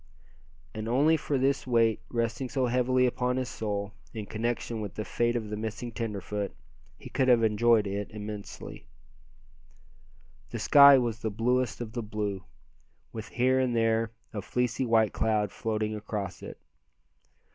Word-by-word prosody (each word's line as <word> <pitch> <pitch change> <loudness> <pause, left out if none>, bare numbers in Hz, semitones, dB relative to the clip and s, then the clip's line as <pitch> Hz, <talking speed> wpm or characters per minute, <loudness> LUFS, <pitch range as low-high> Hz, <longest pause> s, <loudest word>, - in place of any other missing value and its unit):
And 110 0 -5
only 145 +7 +4
for 145 -2 -1
this 135 +1 +1
weight 115 -3 +3
resting 115 +2 -2
so 130 -1 0
heavily 125 +1 +2
upon 125 0 0
his 130 -1 -2
soul, 105 -1 -3 0.2
in 110 -2 -4
connection 115 +1 -3
with 105 -2 -6
the 110 - -4
fate 120 0 0
of 110 -3 -3
the - - -2
missing 110 +2 -5
tenderfoot, 105 -3 -4 0.4
he - - -11
could 130 -2 +1
have 120 -2 +5
enjoyed 110 0 +4
it 100 +1 -3
immensely. 105 -1 -8 1.6
The - - -5
sky 140 +4 +8
was 120 -3 -1
the 110 - -2
bluest 120 +3 0
of 115 -2 -5
the 120 - -2
blue, 105 -3 -3 0.7
with 110 0 -6
here 130 +2 +2
and 125 -2 +1
there 115 0 +2 0.2
a 105 - -3
fleecy 125 +2 -1
white 110 -2 +3
cloud 105 -3 +1
floating 110 -1 -2
across 105 -5 -5
it. - - -8
115 Hz, 155 wpm, -28 LUFS, 105-125 Hz, 1.6 s, sky